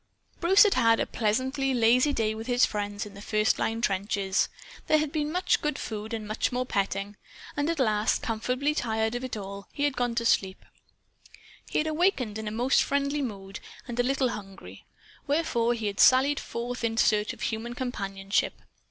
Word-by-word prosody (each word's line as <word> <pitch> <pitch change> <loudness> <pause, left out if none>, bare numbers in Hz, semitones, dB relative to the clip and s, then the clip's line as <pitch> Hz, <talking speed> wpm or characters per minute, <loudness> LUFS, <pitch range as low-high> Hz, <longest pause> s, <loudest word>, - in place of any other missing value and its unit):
Bruce 380 +4 +6
had 415 - +3
had 230 -1 +4
a - - +1
pleasantly 260 +5 0
lazy 245 +4 +4
day 220 -5 0
with 220 +2 -7
his 245 0 +4
friends 205 -1 -3
in 205 - -11
the 200 - -11
first 215 +1 +1
line 225 +1 -1
trenches. 195 -2 0 0.4
There 310 - +5
had 305 -1 -1
been 300 -1 -1
much 360 +2 +1
good 300 0 -1
food 215 -1 -5
and 225 -2 -4 0.3
more 250 +1 -1
petting. 200 -2 -2 0.4
And 290 +2 0
at 335 - -1
last, 215 -5 +1
comfortably 250 +6 -1
tired 220 -4 -1
of 245 +1 -3
it 255 -3 -4
all, 200 0 -7
he 285 - -3
had 290 -2 +1
gone 245 -1 -1
to 235 0 -1
sleep. 190 -4 +1 1.0
He - - -1
had 305 - +2
awakened 305 - +1
in 220 - -5
a - - -2
most 245 +5 +2
friendly 280 +1 0
mood, 195 -6 -6 0.3
and 240 -1 -5
a - - +6
little 260 0 +1
hungry. 195 -3 -9 0.4
Wherefore 255 -6 +1
he 225 -2 -5
had 200 -1 -3
sallied 270 +3 +5
forth 245 +1 -5
in 225 -1 -1
search 210 -2 +3
of - - -11
human 235 +2 -3
companionship. 195 -6 -2
235 Hz, 185 wpm, -27 LUFS, 210-270 Hz, 1.0 s, Bruce